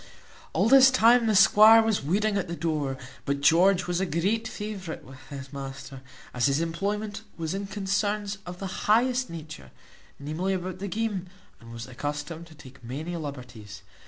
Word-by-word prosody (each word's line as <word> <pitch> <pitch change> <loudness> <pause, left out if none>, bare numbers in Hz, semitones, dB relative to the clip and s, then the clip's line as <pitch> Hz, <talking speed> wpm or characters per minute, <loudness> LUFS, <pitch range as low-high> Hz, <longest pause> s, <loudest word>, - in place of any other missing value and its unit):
All 190 +6 +2
this 265 +1 +8
time 240 -1 +4
the 215 - +2
squire 215 +4 +7
was 220 -8 0
waiting 200 +7 +1
at 195 -2 -1
the 170 - -4
door; 150 -5 -2 0.3
but 140 0 -1
George 180 +5 +4
was 175 0 -1
a 190 - 0
great 200 +8 0
favourite 205 -6 -6
with 130 0 -13
his 135 -1 -9
master, 135 -1 -8 0.3
as 125 +1 +2
his 140 +1 +1
employment 200 +5 -3 0.2
was 165 0 -3
in 195 +1 -4
concerns 205 +1 -2
of 180 0 -7
the 190 0 -6
highest 250 +3 +3
nature, 155 - -9 0.5
namely, 155 +7 -2
about 185 0 -5
the 200 - -4
game, 205 -2 -2 0.3
and 115 0 -13
was 115 0 -7
accustomed 145 +5 -5
to 160 - -16
take 130 -4 -15
many 150 +9 -5
liberties. 125 - -8
175 Hz, 170 wpm, -26 LUFS, 140-205 Hz, 0.5 s, this